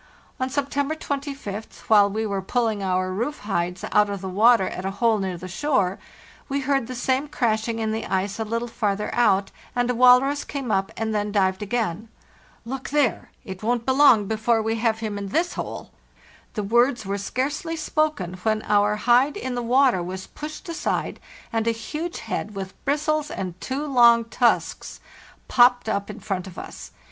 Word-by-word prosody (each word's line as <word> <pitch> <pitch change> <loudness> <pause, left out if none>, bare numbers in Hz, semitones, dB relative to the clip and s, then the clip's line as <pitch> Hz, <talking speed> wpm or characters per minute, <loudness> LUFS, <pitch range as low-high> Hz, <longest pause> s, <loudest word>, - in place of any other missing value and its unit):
On 260 0 -1
September 285 +2 -1
25th, 275 -8 -5
while 205 -2 +5
we 220 +2 -2
were 200 -2 -2
pulling 220 +1 0
our 185 -1 0
roof 240 +10 -3
hides 180 -3 -2
out 210 0 +4
of 200 -1 -3
the 190 - -5
water 210 +1 +4
at 185 - -5
a 190 - -1
hole 225 -1 +3
near 190 -2 -3
the 185 +2 -8
shore, 195 -3 0 0.5
we 280 +1 -1
heard 270 -3 0
the 255 - -6
same 260 +3 0
crashing 230 -4 0
in 220 -1 -1
the 220 +1 -3
ice 195 +2 -1
a - - 0
little 230 +2 -2
farther 210 -3 -2
out, 200 -5 +2 0.2
and 245 0 +1
a - - -1
walrus 250 +4 +5
came 270 -5 -4
up 195 -1 0
and 220 0 -2
then 210 0 -1
dived 190 -1 +1
again. 220 -2 -2 0.6
"Look 265 +2 -5
there! 280 -9 +1 0.2
It 190 -1 -7
won't 235 +1 0
be 265 - +2
long 260 -7 +6
before 220 +2 +1
we 225 +1 -1
have 225 -1 0
him 210 -2 -3
in 200 - -5
this 335 - 0
hole." - - -6 0.6
The 210 - -1
words 240 +2 +2
were 200 +1 -2
scarcely 290 - -2
spoken, 305 - -1
when 215 +1 0
our 205 0 +2
hide 245 +6 +3
in 260 -1 -4
the 245 - -2
water 250 -3 +3
was 185 +2 -5
pushed 305 +5 -8
aside 335 - -2 0.3
and 225 0 0
a - - +4
huge 305 +10 -5
head, 210 0 -4
with 195 -1 -5
bristles 305 +1 0
and 185 - -4
two 275 +3 -3
long 235 -4 +5
tusks, 235 +1 0 0.5
popped 245 -1 +4
up 200 -2 -1
in 210 - -7
front 195 -3 -3
of 185 - -11
us. - - -8
225 Hz, 185 wpm, -24 LUFS, 200-260 Hz, 0.6 s, long